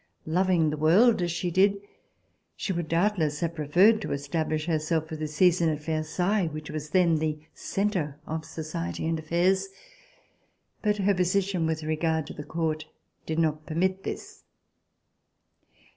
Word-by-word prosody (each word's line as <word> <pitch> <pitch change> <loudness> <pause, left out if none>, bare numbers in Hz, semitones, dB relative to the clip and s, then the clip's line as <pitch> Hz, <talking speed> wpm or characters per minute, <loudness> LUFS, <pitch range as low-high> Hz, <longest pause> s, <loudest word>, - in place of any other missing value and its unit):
Loving 170 -1 +2
the 150 - -3
world 185 +9 +5
as 175 -1 0
she 175 +1 -2
did, 195 +3 +4 0.8
she 195 - -2
would 170 -2 -3
doubtless 165 -3 +1
have 170 -1 -1
preferred 175 +9 +4
to - - -4
establish 155 +2 -2
herself 160 -1 0
for 160 - -6
the 155 0 -3
season 170 +2 +3
at 150 -2 -1
Versailles, 170 +5 0
which 155 -1 -6
was 155 -1 -5
then 170 -1 +3
the 155 -1 -1 0.2
centre 185 -8 -2
of 160 0 -4
society 155 - -5
and 165 0 0
affairs. 180 +5 +1 1.1
But 210 -1 +1
her 200 0 +2
position 185 -1 +1
with 160 -1 -2
regard 160 0 0
to - - -8
the 150 - -7
Court 155 -1 -2 0.4
did 160 - -2
not 155 -2 0
permit 185 +4 0
this. - - -7
160 Hz, 150 wpm, -27 LUFS, 155-185 Hz, 1.1 s, world